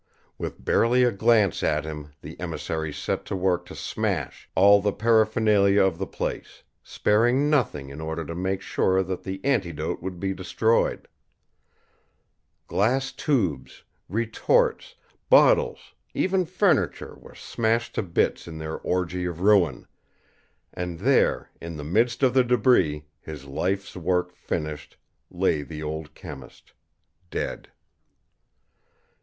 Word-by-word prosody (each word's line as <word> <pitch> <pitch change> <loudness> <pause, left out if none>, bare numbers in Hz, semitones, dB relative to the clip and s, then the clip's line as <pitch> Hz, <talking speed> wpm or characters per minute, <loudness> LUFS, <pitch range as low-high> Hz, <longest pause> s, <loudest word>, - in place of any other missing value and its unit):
With - - -6
barely 125 +2 +3
a 120 - +4
glance 110 -2 +3
at 75 0 0
him 75 -1 -7
the - - -9
emissaries 80 -2 -4
set - - -2
to - - -4
work 90 -1 0
to - - -10
smash - - -3
all 100 +1 +6
the 105 0 +1
paraphernalia 110 -3 +3
of 95 -3 0
the 95 - -3
place, - - -5 0.2
sparing 120 +7 +2
nothing 75 - 0
in 70 +3 -8
order 80 +1 -4
to 85 - -6
make 95 +2 -2
sure 95 -1 +1
that 95 0 -4
the 95 +1 -5
antidote 95 - -1
would 90 0 -6
be 95 +1 -1
destroyed. 110 +5 0 1.6
Glass 130 +6 +1
tubes, 95 - -1 0.3
retorts, 115 - +1 0.3
bottles, 485 -1 +4 0.2
even 185 -1 +1
furniture 180 - +1
were - - -15
smashed 115 +1 -1
to - - -1
bits 85 -3 -1
in 80 -1 -7
their 80 0 -5
orgy 90 0 -2
of 85 -1 -4
ruin 100 -3 +3 0.9
and 90 -1 -4
there, - - +2
in 85 -1 -6
the 75 - -6
midst 115 - +1
of 130 -2 +4
the 130 -1 +5
debris, 105 - +2
his 75 -3 -9
life's 95 +8 -2
work 90 0 -1
finished, 75 -2 -5 0.3
lay 75 - 0
the 75 +1 -7
old 75 0 -5
chemist, 75 -8 -11 0.6
dead. - - -4
95 Hz, 130 wpm, -25 LUFS, 80-115 Hz, 1.6 s, all